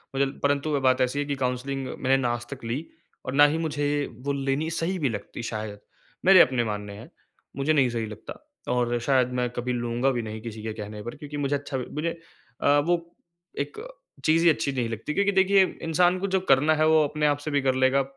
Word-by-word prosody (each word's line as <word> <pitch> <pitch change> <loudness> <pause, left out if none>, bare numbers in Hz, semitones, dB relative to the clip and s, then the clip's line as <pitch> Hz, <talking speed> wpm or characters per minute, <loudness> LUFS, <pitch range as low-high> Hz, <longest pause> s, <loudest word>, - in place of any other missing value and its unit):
मुझे 140 +1 +3 0.2
परंतु 145 +1 +1
वो 145 -2 +1
बात 130 0 +3
ऐसी 130 +3 +1
है 145 - 0
कि 140 -1 -2
काउंसलिंग 130 +1 -2
मैंने 135 +1 +1
ना 125 -2 0
आज 120 0 -5
तक 130 - -12
ली 125 +8 -3 0.4
और 130 - -3
ना 145 +1 +7
ही 150 +2 +1
मुझे, 145 -2 -1 0.2
वो 140 +2 -1
लेनी 140 +3 -1
सही 165 +3 -1
भी 140 - +1
लगती 115 +1 -6
शायद। 105 -2 -5 0.5
मेरे 190 0 +8
अपने 125 -2 +3
मानने 105 -2 -4
हैं, - - -11 0.5
मुझे 140 +3 +2
नहीं 135 -4 +3
सही 115 -2 -2
लगता 110 0 -8 0.4
और 120 -1 +1
शायद 130 -3 +3
मैं 125 -1 0
कभी 125 +1 -3
लूँगा 120 +2 0
भी 120 - -1
नहीं 110 -1 -6
किसी 110 -2 -7
के 110 -1 -3
कहने 105 -1 -7
पर, 120 +4 -6
क्योंकि 145 0 -8
मुझे 145 0 0
अच्छा 140 -1 -4
भी 125 - -4
मुझे 165 +2 -2 0.4
अ, 145 - +4
वो 175 +4 +2 0.6
एक 145 +1 -4 0.5
चीज़ 165 +2 +4
ही 170 - +7
अच्छी 145 -2 +1
नहीं 125 -4 -2
लगती, 115 +6 -4
क्योंकि 200 +4 +2
देखिए 195 0 +5 0.2
इंसान 175 +3 +2
को 200 - -1
जो - - +4
करना 145 +4 +5
है 155 0 +2
वो 160 -1 +5
अपने 150 +1 -2
आप 145 -1 +2
से 155 - -2
भी 145 -1 +2
कर 130 -1 +1
लेगा। 130 +1 +3
135 Hz, 230 wpm, -26 LUFS, 120-150 Hz, 0.6 s, मेरे